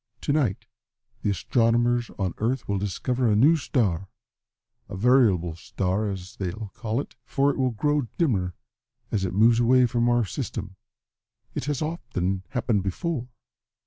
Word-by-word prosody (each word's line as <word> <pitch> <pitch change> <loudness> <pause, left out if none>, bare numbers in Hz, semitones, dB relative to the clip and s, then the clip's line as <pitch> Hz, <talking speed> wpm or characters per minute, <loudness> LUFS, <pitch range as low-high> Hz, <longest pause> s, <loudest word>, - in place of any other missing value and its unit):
To 145 - 0
night 130 -11 0 0.6
the - - 0
astronomers 120 +3 +2
on 95 -4 -1
Earth 120 +3 -1
will 100 -1 0
discover 120 +6 -1
a 105 - +3
new 140 +10 +6
star 100 - 0 0.8
a - - -6
variable 100 -8 +3
star 95 +4 -1
as 95 +3 -7
they'll 100 +2 -4
call 115 +1 -2
it - - -6
for 140 +2 +2
it - - -6
will 130 -1 +3
grow 145 +3 0
dimmer 95 - +1 0.6
as 100 -3 0
it 90 - -3
moves 115 +3 +5
away 125 +1 +5
from 120 0 +1
our 120 -2 +3
system. 100 -4 -5 0.8
It - - -3
has 145 0 -1
often 95 - -2
happened 120 -5 0
before." 125 - -2
115 Hz, 150 wpm, -25 LUFS, 95-130 Hz, 0.8 s, new